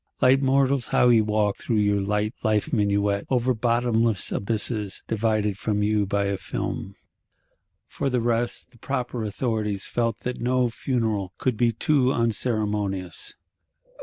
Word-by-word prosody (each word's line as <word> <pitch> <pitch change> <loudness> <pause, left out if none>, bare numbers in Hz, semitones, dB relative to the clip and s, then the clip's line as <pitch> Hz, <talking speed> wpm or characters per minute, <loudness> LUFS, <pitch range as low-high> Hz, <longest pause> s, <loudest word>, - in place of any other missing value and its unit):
Light 130 +2 +5
mortals, 135 -1 +2
how 125 - +4
ye 115 -2 +6
walk 105 -1 +1
your 105 -3 +2
light 105 +2 -1
life 110 +6 0
minuet, 100 -2 +1
over 130 0 +2
bottomless 115 -2 +1
abysses, 105 -1 -2
divided 105 -2 0
from 105 -2 0
you 105 -1 +1
by 100 0 0
a 100 0 -1
film! 95 +1 -4 0.9
For 140 - -2
the 125 -1 +1
rest, 120 +2 -1
the 120 - -21
proper 125 -3 -3
authorities 105 -2 -2
felt 115 -2 -1
that 125 0 -4
no 125 0 +1
Funeral 110 -7 -1
could 130 -3 0
be 120 +1 +2
too 130 +3 +2
unceremonious. 105 -6 -1
110 Hz, 135 wpm, -25 LUFS, 105-125 Hz, 0.9 s, ye